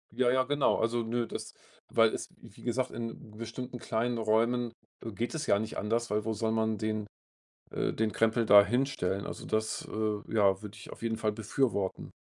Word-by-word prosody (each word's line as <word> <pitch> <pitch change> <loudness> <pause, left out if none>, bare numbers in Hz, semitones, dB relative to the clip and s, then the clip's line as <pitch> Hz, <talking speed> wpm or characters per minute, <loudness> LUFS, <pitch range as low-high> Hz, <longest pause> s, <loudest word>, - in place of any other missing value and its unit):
Ja, 125 0 +3
ja, 130 0 +3
genau. 145 +1 +2
Also 115 +1 +1
nö, 115 +1 -1
das - - -6 0.4
weil 115 -1 +4
es, - - -5
wie - - -14
gesagt, 125 +1 0
in 115 -2 -7
bestimmten 125 +3 -6
kleinen 120 0 -1
Räumen, 115 +2 +2 0.3
äh, 115 - -5
geht 115 - -3
es 155 0 -2
ja 100 - +4
nicht 110 +1 -4
anders, 115 +3 0
weil 105 0 0
wo 110 - 0
soll 110 +1 0
man 110 -1 +1
den 110 -1 -2 0.6
äh, - - -1
den 110 -1 0
Krempel 115 +1 +2
da 100 -1 +9
hinstellen? 110 -6 0
Also - - -6
das, 110 0 -1
äh, 110 -1 -2
ja, 100 -2 +4
würde 105 -1 -8
ich 100 - -11
auf - - -11
jeden 115 -1 -1
Fall 110 -1 +1
befürworten. 110 -2 -1
110 Hz, 195 wpm, -30 LUFS, 110-120 Hz, 0.6 s, da